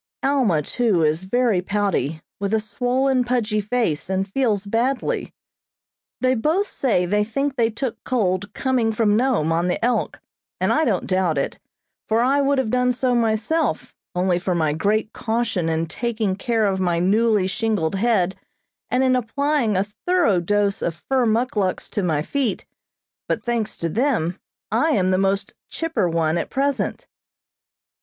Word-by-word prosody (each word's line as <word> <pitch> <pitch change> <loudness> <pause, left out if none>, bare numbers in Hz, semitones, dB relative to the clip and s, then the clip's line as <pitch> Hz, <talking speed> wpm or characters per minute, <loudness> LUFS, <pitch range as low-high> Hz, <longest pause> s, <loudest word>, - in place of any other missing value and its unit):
Alma, 250 - +2
too, 210 - +1
is 155 +4 +1
very 230 -2 +2
pouty, 185 -7 -1 0.2
with 200 +2 0
a - - +2
swollen, 250 +4 +1
pudgy 235 -4 0
face, 205 -8 -1
and 190 0 0
feels 210 -3 0
badly. 240 +6 -1 0.9
They 255 0 +3
both 310 - +1
say 225 - 0
they 210 +3 +1
think 275 +6 -2
they 230 -3 +2
took 230 +2 -4
cold 205 -5 0
coming 255 -4 +1
from 215 -1 +2
Nome 230 - +1
on 170 +2 +1
the 180 - 0
"Elk," 245 - 0 0.4
and - - +2
I 315 - +2
don't 200 -7 0
doubt 185 -5 +1
it, 140 - -2 0.5
for 220 +1 +3
I 270 +4 +3
would 280 0 +2
have 255 -5 0
done 250 0 +2
so 250 0 0
myself 230 +7 0 0.2
only 180 0 +1
for 180 0 -1
my 155 -3 +1
great 210 +7 0
caution 220 -7 -1
in 160 0 0
taking 215 +2 -2
care 225 +2 0
of 190 -2 0
my 175 -2 +1
newly 210 +3 +2
shingled 200 -3 -1
head 195 -3 +1 0.5
and 250 +1 +2
in 255 -1 +3
applying 255 -2 0
a 190 - +1 0.2
thorough 350 - +3
dose 200 +3 0
of 165 - -1 0.2
fur 260 -3 +3
muckluks 220 -4 0
to 210 - -1
my 155 -5 0
feet, 255 - -2 0.6
but, - - -1
thanks 235 -3 -2
to 170 - -2
them, 185 - 0 0.3
I 320 -1 +2
am 185 -6 +2
the 185 - +2
most 195 +1 0 0.2
"chipper" 260 - -1
one 165 0 +1
at - - -4
present. 275 0 -1
215 Hz, 165 wpm, -22 LUFS, 185-250 Hz, 0.9 s, They